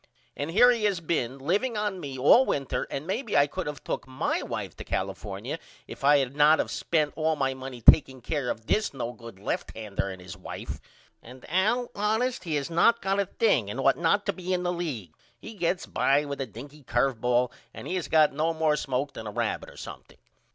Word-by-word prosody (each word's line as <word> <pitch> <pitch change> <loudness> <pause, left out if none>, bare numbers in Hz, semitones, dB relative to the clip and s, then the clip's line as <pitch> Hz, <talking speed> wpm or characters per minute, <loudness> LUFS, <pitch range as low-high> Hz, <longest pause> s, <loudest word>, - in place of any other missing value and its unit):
And 145 +2 -3
here 240 +8 +6
he 230 -3 0
has 200 -4 +1
been 140 -6 -1
liveing 205 - 0
on 210 -3 -1
me 135 -5 -6
all 145 - +6
winter 140 - -2
and 140 - -4
maybe 220 - -1
I 140 - +6
could 145 - -5
of 150 -1 -6
took - - -4
my 130 0 -1
wife - - -5
to - - -7
California - - -4 0.3
if - - -10
I 145 +1 +6
had 135 -1 -1
not 150 +2 +6
of - - -1
spent 155 -3 0
all 160 0 +1
my 135 -2 0
money 130 -2 -8
takeing 130 -3 +7
care 135 0 -2
of 110 - -4
this 210 - 0
no 120 -2 -3
good 115 -3 -11
lefthander 100 0 -3
and 95 - -9
his 90 - -9
wife. - - -7 0.4
And 125 +2 -13
Al 215 +8 +1
honest 220 +3 0
he 160 -3 -1
has 145 +3 -2
not 230 +8 +4
got 195 +1 +1
a 200 - +1
thing 140 - +2
and 125 - -5
ought 135 0 +4
not 175 +5 +1
to 200 - 0
be 185 0 -5
in 180 - -2
the 175 0 0
league. 135 - -4 0.3
He 220 - -9
gets 180 -2 -1
by 145 +2 +2
with 140 -1 -4
a 135 - -3
dinky 140 +7 -11
curve 120 -1 0
ball 125 0 +2 0.2
and - - -9
has 180 -2 -2
not - - -20 0.2
got - - -18
no 160 +3 0
more 155 -1 +2
smoke 135 0 -2
than 110 - -7
a - - -4
rabbit 115 +1 -2
or - - -15
something. - - -10
145 Hz, 220 wpm, -27 LUFS, 130-185 Hz, 0.4 s, takeing